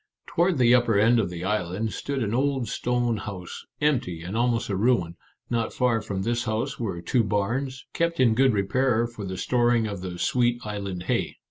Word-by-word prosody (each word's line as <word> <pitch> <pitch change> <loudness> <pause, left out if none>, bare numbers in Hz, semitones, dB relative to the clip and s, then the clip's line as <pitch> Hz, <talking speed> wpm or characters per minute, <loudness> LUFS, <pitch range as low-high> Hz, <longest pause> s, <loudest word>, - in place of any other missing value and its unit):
Toward 175 -1 +1
the 120 -1 +5
upper 120 -4 +4
end 115 +3 +5
of 100 - 0
the 90 0 -6
island 105 +1 -1
stood 140 -3 -2
an 105 0 -2
old 135 -1 0
stone 120 +1 0
house, 95 -3 -7
empty 115 - 0
and 90 +5 -5
almost 120 0 +1
a 100 - 0
ruin; 95 -5 +1 0.4
not 115 -1 0
far 120 -3 +1
from 95 -2 -4
this 120 +2 -1
house 110 0 -2
were 95 -7 -3
two 125 -3 +2
barns, 120 +6 -2
kept 170 0 0
in 120 -4 +5
good 130 +3 +4
repair 115 +4 +1
for 115 -4 -7
the 95 0 -5
storing 120 +2 +2
of 100 -3 -5
the 90 -1 -5
sweet 120 +4 +1
island 100 -4 -4
hay. - - -1
115 Hz, 195 wpm, -25 LUFS, 100-125 Hz, 0.4 s, the